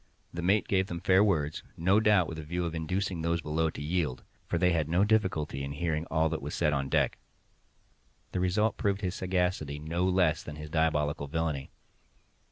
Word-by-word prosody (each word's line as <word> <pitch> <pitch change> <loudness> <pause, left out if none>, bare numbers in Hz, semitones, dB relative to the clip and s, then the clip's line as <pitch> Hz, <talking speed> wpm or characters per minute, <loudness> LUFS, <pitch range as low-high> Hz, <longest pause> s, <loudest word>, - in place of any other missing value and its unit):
The 85 - -4
mate 100 +4 +2
gave 95 -1 +1
them 85 -2 -4
fair 95 +2 +4
words—no 85 +2 +1
doubt 105 -5 +4
with 80 - -6
a - - -6
view 85 +3 -2
of 85 - -3
inducing 90 +2 -2
those 85 +1 0
below 80 +1 0
to 75 - -7
yield, 75 -6 -1 0.2
for 85 - 0
they 90 +1 +3
had 80 -3 0
no 90 +4 +3
difficulty 95 -10 +1
in 70 +1 -4
hearing 80 +1 -2
all 80 0 +2
that 80 -2 -3
was 75 +2 -5
said 75 -3 +2
on 70 -1 -1
deck. - - +1 1.1
The - - -2
result 100 +5 +1
proved 100 0 0
his 90 -3 -1
sagacity, 90 -6 -1
no 80 +4 -1
less 90 -4 +2
than 75 - -8
his 75 0 -8
diabolical 75 -2 +1
villainy. 75 -2 -2
85 Hz, 190 wpm, -29 LUFS, 75-95 Hz, 1.1 s, fair